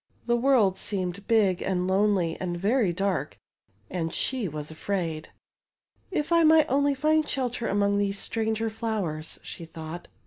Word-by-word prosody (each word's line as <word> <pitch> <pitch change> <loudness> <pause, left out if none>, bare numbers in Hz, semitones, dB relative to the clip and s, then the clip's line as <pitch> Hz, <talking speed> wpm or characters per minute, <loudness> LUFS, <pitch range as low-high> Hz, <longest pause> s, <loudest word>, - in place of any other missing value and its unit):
The 240 - +2
world 235 -6 +3
seemed 190 -1 -3
big 205 -6 +3
and 180 -1 0
lonely 190 -3 +2
and 175 -2 -2
very 205 +2 +2
dark, 195 +2 -2 0.5
and 165 -3 -3
she 255 +1 -1
was 150 -1 -6
afraid. 165 -2 -3 0.8
If 305 -4 -2
I 335 -1 +5
might 315 0 +6
only 280 +1 +2
find 310 +2 +2
shelter 245 -3 -1
among 200 0 +2
these 200 0 0
stranger 225 +1 -1
flowers," 205 -9 -3
she - - -8
thought. 165 +1 -8
200 Hz, 145 wpm, -27 LUFS, 175-240 Hz, 0.8 s, might